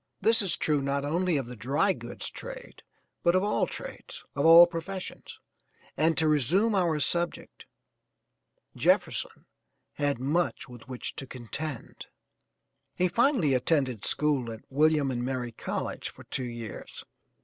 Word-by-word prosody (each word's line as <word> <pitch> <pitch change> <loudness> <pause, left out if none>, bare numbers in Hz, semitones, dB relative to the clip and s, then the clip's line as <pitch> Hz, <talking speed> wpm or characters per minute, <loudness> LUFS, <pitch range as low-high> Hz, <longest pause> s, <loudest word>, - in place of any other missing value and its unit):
This 225 +1 +5
is 190 -4 0
true, 150 -2 +1
not 140 +1 -1
only 170 +2 +1
of 135 - -2
the 125 +1 -9
dry 140 - +1
goods - - -7
trade - - -9 0.4
but 170 +1 +3
of 185 - +3
all 210 - +1
trades, - - -7
of 140 +2 +2
all 165 +1 +10
professions, 175 +3 -7 0.6
and 160 +2 +2
to 160 - +3
resume 160 - +3
our 170 -6 +1
subject 170 +4 0 1.1
Jefferson - - 0 0.5
had 145 -2 0
much 150 +8 -1
with 120 -1 -13
which 125 -2 -5
to 135 - -6
contend. 130 +3 -6 0.9
He 180 - +2
finally 230 - +2
attended 130 -3 +1
school 140 -6 +1
at 110 - -8
William 150 -1 +3
and 120 -1 -2
Mary 125 -2 -3
College - - -4
for - - -14
two 130 -2 -3
years. 115 -3 -8
150 Hz, 140 wpm, -28 LUFS, 130-175 Hz, 1.1 s, all